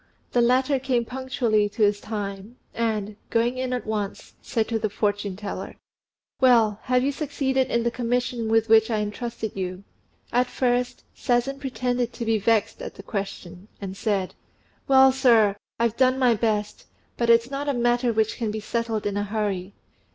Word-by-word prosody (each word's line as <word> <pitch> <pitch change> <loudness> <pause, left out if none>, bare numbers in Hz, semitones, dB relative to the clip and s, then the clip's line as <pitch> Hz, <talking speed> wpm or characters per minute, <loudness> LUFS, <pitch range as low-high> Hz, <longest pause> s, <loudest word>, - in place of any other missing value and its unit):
The 245 - +3
latter 260 +3 +3
came 250 -2 0
punctually 245 -5 0
to 210 +2 -1
his 205 0 +2
time, 205 +1 -5 0.2
and, 215 -3 -2
going 240 +2 +1
in 255 0 -2
at 250 -1 -2
once, 210 -2 -4
said 225 -2 -1
to 225 -1 0
the 215 0 -1
fortune 205 -1 -1
teller, 205 +1 -6 0.6
"Well, 230 -5 +4
have 250 0 +2
you 280 - +1
succeeded 270 -3 -1
in 235 0 +1
the 235 - 0
commission 240 -1 -1
with 225 0 +3
which 220 0 +5
I 215 -2 0
entrusted 220 +1 -4
you?" 185 0 -4 0.5
At 245 +1 +3
first 250 0 -1
Sazen 250 +3 0
pretended 250 -3 -2
to 235 - -5
be 225 -1 +2
vexed 220 +1 +1
at - - -7
the 195 - -11
question, 195 -2 -6
and 195 -2 -6
said, 200 -2 -1 0.5
"Well, 265 -1 +7
sir, 235 -6 +4 0.2
I've 235 -1 +1
done 255 0 +3
my 250 -3 +4
best; 210 -1 -2 0.3
but 235 -1 0
it's 230 +2 +4
not 285 +1 -2
a - - +3
matter 240 0 +2
which 220 -1 0
can 225 -3 -2
be 215 +1 -3
settled 225 0 -2
in 205 0 -1
a 205 - 0
hurry. 205 -2 -3
230 Hz, 175 wpm, -24 LUFS, 210-250 Hz, 0.6 s, Well